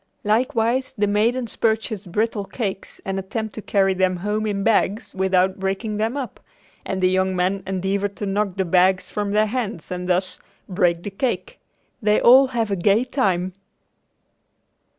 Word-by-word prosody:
Likewise 235 +3 +1
the 205 - +2
maidens 225 +3 0
purchase 220 -2 -1
brittle 210 +2 -1
cakes 195 -3 -5
and 195 0 -2
attempt 215 +3 -4
to 215 - -6
carry 195 -2 +2
them 185 0 +1
home 210 +4 -2
in 200 -1 -1
bags 215 -1 +1
without 190 0 +1
breaking 195 +3 -2
them 225 +5 -1
up, 265 -4 -5 0.4
and 190 -1 -3
the - - +6
young 185 0 +1
men 185 +2 0
endeavor 195 +1 -1
to 200 +1 -7
knock 200 -1 -1
the 190 -1 0
bags 185 +2 +2
from 205 -1 -2
their 210 +1 +3
hands 215 -8 -4
and 180 0 -4
thus, 185 +1 0 0.3
"break 175 -3 +1
the 205 - -5
cake." 265 - -3 0.4
They 210 0 +3
all 265 +3 +7
have 230 -4 -2
a - - +2
gay 200 +5 +3
time. 190 -9 0
200 Hz, 165 wpm, -22 LUFS, 190-220 Hz, 0.4 s, all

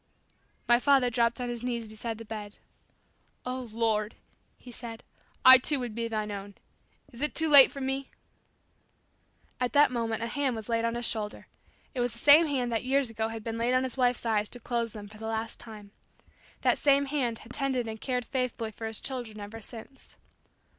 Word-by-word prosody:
My 240 0 +5
father 265 -2 +3
dropped 235 0 +1
on 250 - -3
his 240 -1 -4
knees 240 -2 -3
beside 220 +1 -5
the 230 - -10
bed. 210 -1 -7 0.9
"Oh, 255 -1 -4
Lord," 220 -1 0 0.4
he 250 - -13
said, 230 -1 -8 0.4
"I, 260 0 +11
too, 285 +2 +2
would 245 -3 -4
be 230 +1 -3
Thine 215 -2 -3
own. 200 0 -7 0.6
Is 240 - -11
it 295 - +1
too 320 - +3
late 285 -3 +9
for 275 - -8
me?" 270 0 -3 1.5
At 250 -1 -1
that 290 -2 +5
moment 230 -2 -2
a - - 0
hand 265 +1 -1
was 220 -2 -7
laid 230 0 +1
on 230 0 -1
his 240 0 -2
shoulder. 210 -2 -4 0.5
It 260 - -4
was 245 -1 0
the - - -12
same 295 +6 +7
hand 255 -4 -1
that 225 - -1
years 265 -1 +1
ago 220 0 -2
had 225 -1 -7
been 230 0 -4
laid 240 +2 +1
on 255 - +3
his 260 -2 -4
wife's 250 -2 +1
eyes 215 -2 0
to 245 - -8
close 235 -1 -2
them 205 -1 -8
for 210 +1 -14
the 220 - -6
last 225 0 -3
time. 210 -3 -11 0.7
That - - +2
same 280 -1 +3
hand 265 -5 -1
had 240 - -11
tended 265 -4 0
and 220 0 -7
cared 250 -2 -2
faithfully 250 -4 -3
for 225 +1 -6
his 220 -1 -4
children 240 -5 -5
ever 210 +2 -8
since. 240 +4 -11
235 Hz, 200 wpm, -28 LUFS, 225-255 Hz, 1.5 s, I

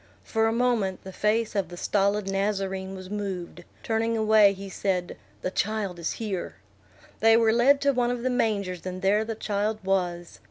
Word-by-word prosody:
For 225 -1 +1
a - - +2
moment 230 -6 0
the 190 - -8
face 215 +2 0
of 200 -2 0
the 175 - -9
stolid 200 +1 +1
Nazarene 195 -1 -2
was 185 0 -9
moved; 190 -4 -5 0.2
turning 225 0 0
away, 215 -2 +5
he 195 0 -8
said, 185 -2 -2 0.3
"The 185 - -1
child 200 -4 -2
is 170 - -2
here." 205 -6 -4 0.6
They 225 0 +6
were 225 -1 +4
led 265 +4 +5
to 280 0 +3
one 245 -1 +1
of 245 -1 -3
the 255 - +1
mangers, 200 -7 -1
and 185 +1 -6
there 205 +3 +3
the 225 0 -4
child 210 0 -1
was. 175 - -1
205 Hz, 185 wpm, -26 LUFS, 190-225 Hz, 0.6 s, They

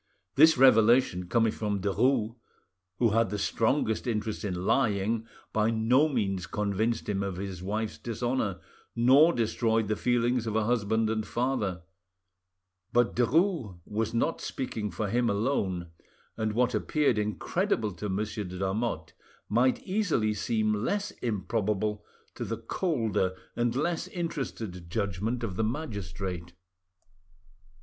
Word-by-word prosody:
This 160 +1 +6
revelation, 115 -6 +5
coming 115 0 +3
from 105 -2 -2
Derues, 110 +3 +1 0.6
who 120 - +3
had 115 -1 +2
the 105 - -2
strongest 110 +2 0
interest 110 -1 -2
in 90 -3 -3
lying, 110 -2 +1 0.3
by 110 0 +2
no 120 +7 +3
means 95 - -1
convinced 105 +3 -1
him 100 -2 -1
of 100 -2 -3
his 95 -1 -5
wife's 105 +3 -3
dishonour, 120 -4 -2 0.4
nor 135 +8 +6
destroyed 115 -3 +1
the 105 - +1
feelings 120 0 +1
of 110 - -2
a 110 - +2
husband 110 -1 +1
and 110 -1 -1
father; 115 -8 -1 1.1
but 120 -1 +2
Derues 125 - +1
was 110 +1 -2
not 120 +8 0
speaking 110 -5 -3
for 110 - -3
him 120 +4 +1
lone, 100 -6 -1 0.4
and 110 -1 -1
what 125 +2 +2
appeared 145 -8 +1
incredible 110 - -1
to 100 +4 -5
Monsieur 105 +2 -2
de 90 0 -7
Lamotte 100 +5 -2 0.4
might 125 +4 +2
easily 180 - +1
seem 110 +1 0
less 200 - -1
improbable 105 -1 -1 0.3
to - - -5
the - - -3
colder 115 - -1 0.2
and 120 0 0
less 170 +5 -1
interested 135 - -5
judgment 105 +5 -2
of 95 -5 -3
the 110 - +1
magistrate. 95 - -4
110 Hz, 130 wpm, -28 LUFS, 100-125 Hz, 1.1 s, This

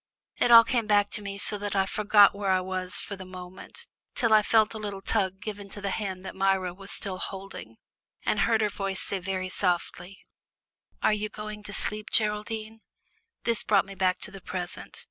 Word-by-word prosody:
It 245 - +2
all 230 -1 +10
came 230 -2 0
back 205 -1 +3
to - - -2
me 200 -1 -5
so 205 +1 +2
that 205 0 -3
I 195 -1 +3
forgot 205 0 +5
where 200 -1 -3
I 185 0 +4
was 185 0 -2
for 200 - -5
the 190 - -9
moment, 185 0 -10 0.3
till 230 -4 +2
I 215 - +7
felt 215 +1 +3
a 220 - -6
little 200 -2 -5
tug 190 -3 0
given 205 -1 -7
to 205 - -6
the 200 -1 -2
hand 190 -3 -4
that - - -6
Myra 190 -2 +1
was 195 +2 -13
still 185 -2 -5
holding, 190 - -7 0.5
and 210 - +1
heard 225 +2 +3
her 210 - +2
voice 195 -1 -3
say 200 - -2
very 185 0 -3
softly, 180 0 -2 0.9
"Are - - +4
you 210 0 -2
going 210 0 -7
to 210 - -9
sleep, 210 +1 0
Geraldine?" 215 +1 0 0.6
This 230 -2 +1
brought 200 -2 +3
me 195 - -9
back 185 -1 +1
to 210 - -4
the 195 -1 -10
present. 180 -1 -6
200 Hz, 205 wpm, -27 LUFS, 190-210 Hz, 0.9 s, all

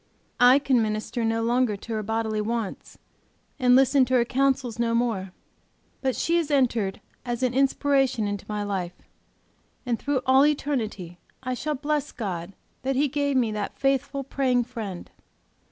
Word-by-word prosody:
I 245 +2 +7
can 270 -4 +2
minister 215 +2 -2
no 225 0 0
longer 235 -2 +1
to 230 +3 -7
her 215 - -1
bodily 220 0 -1
wants, 225 -2 -4 0.6
and 250 -1 +5
listen 270 +1 +5
to 255 +1 0
her 240 -1 +4
counsels 260 -2 0
no 230 -1 +1
more, 220 -6 -1 0.7
but 260 -2 0
she 335 +1 +1
has 330 -3 -1
entered 240 -9 +1 0.2
as 240 0 -3
an 250 -1 +1
inspiration 270 -3 +2
into 205 -1 -5
my 210 -1 -2
life, 185 -3 -4 0.8
and 240 -2 -1
through 280 -3 -1
all 265 +1 +6
eternity 225 - -1 0.2
I 255 0 -2
shall 300 +4 -2
bless 295 +1 -2
God 185 -4 -5 0.3
that 270 +1 -1
He 290 +3 +3
gave 285 0 0
me 235 -4 +2
that 210 -1 -4
faithful, 275 0 0
praying 255 -2 +1
friend. 225 -7 -7
245 Hz, 160 wpm, -25 LUFS, 215-270 Hz, 0.8 s, I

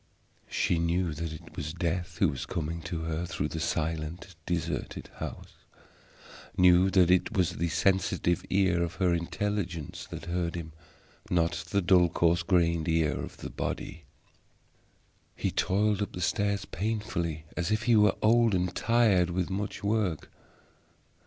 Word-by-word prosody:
She 85 - +1
knew 85 0 0
that 80 +1 -4
it 80 - -11
was 75 +3 -4
Death 85 0 -2
who 95 - +3
was 70 -2 -5
coming 85 0 -3
to 85 -2 -3
her 80 +1 -2
through 75 -2 -2
the 80 - -4
silent 80 +3 -3
deserted 85 -2 -3
house; - - -7 1.0
knew 90 0 +6
that 90 -2 +4
it 95 +4 +2
was 90 -3 +3
the 85 +1 0
sensitive 90 -2 +1
ear 95 -3 +2
of 85 +1 -2
her 90 -3 +2
intelligence 85 -1 -3
that - - -7
heard 85 -1 -2
him, 80 -2 -6 0.6
not 85 -2 0
the 100 -2 +1
dull, 90 -1 +5
coarse 85 0 +2
grained 85 -2 +2
ear 80 -4 +2
of - - -7
the - - -7
body. - - -5 1.3
He - - -1
toiled 105 +2 +1
up 105 - -3
the 90 - -5
stair 100 +2 +1
painfully, 85 -6 -2
as 90 +1 -1
if 110 +1 0
he 120 0 +4
were 105 -2 +5
old 115 -1 +4
and 90 0 -1
tired 110 -7 +3
with 90 +1 -2
much 100 +1 -4
work. 100 -6 -1
90 Hz, 150 wpm, -29 LUFS, 85-95 Hz, 1.3 s, knew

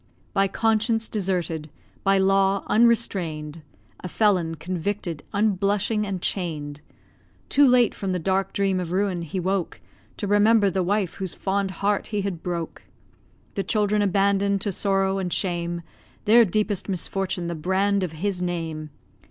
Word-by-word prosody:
By 195 0 +3
conscience 225 +2 +1
deserted, 175 -6 -2 0.3
by 195 0 +4
law 195 0 +3
unrestrain'd, 180 -9 +1 0.4
A - - -6
felon, 180 -4 +1
convicted, 175 0 -3
unblushing, 210 +1 +1
and 195 -2 -3
chain'd; 150 -6 -3 0.7
Too 285 0 +5
late 245 -2 +4
from 195 -2 -3
the 180 - 0
dark 190 +2 0
dream 195 -2 +1
of 175 -2 -4
ruin 185 -2 0
he 170 +3 -4
woke 185 0 -2 0.4
To - - -3
remember 205 0 +4
the 190 - 0
wife 190 0 0
whose 190 -3 -4
fond 195 0 -1
heart 200 +3 -1
he 210 -2 -2
had 190 -4 -4
broke; 170 -2 -4 0.7
The 195 - -2
children 210 0 +1
abandon'd 200 0 +2
to 205 - -1
sorrow 195 0 +1
and 180 -2 -3
shame, 170 -2 -1 0.4
Their 230 +2 +7
deepest 205 0 -1
misfortune 190 -1 -2
the 170 - -2
brand 190 +5 +1
of 180 -4 -3
his 185 +3 -2
name. 165 -3 -3
195 Hz, 145 wpm, -24 LUFS, 175-205 Hz, 0.7 s, Their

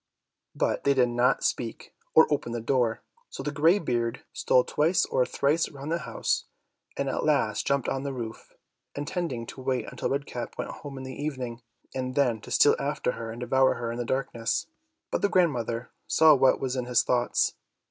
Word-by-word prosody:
But - - 0
they 140 0 +3
did 125 -2 +4
not 120 +2 +2
speak, 115 -2 -2 0.2
or 160 - +9
open 120 -5 -2
the 120 - -2
door, 120 -1 0 0.3
so - - -7
the 145 - -2
grey 160 +6 +4
beard 120 - -2
stole 125 - +3
twice 160 +7 +2
or 125 - +1
thrice 150 +4 +1
round 140 +1 -7
the 170 - +1
house, - - -1 0.5
and 140 - -1
at 135 - -1
last 135 -9 +1
jumped 140 -2 +1
on 135 - -1
the 140 0 -3
roof, 115 -4 -7 0.4
intending 145 -4 -3
to 130 - -9
wait 130 -1 -1
until 125 - -3
Red 140 +1 -1
Cap 120 -4 -6
went - - -4
home 140 -2 -9
in 130 - -6
the 130 0 -6
evening, 130 -5 -4 0.3
and 130 0 -3
then 125 -6 +2
to - - -11
steal - - +5
after - - -1
her 115 -1 -6
and 115 +2 -7
devour 130 +1 +3
her 115 -1 -3
in 120 - -5
the - - 0
darkness. 120 -2 -1 0.5
But - - 0
the 205 - +2
grandmother 125 - +1 0.2
saw 160 -1 +6
what 135 -2 +4
was 130 -1 -2
in 125 -1 -2
his 125 -1 +3
thoughts. 120 -1 +1
130 Hz, 200 wpm, -27 LUFS, 120-140 Hz, 0.5 s, or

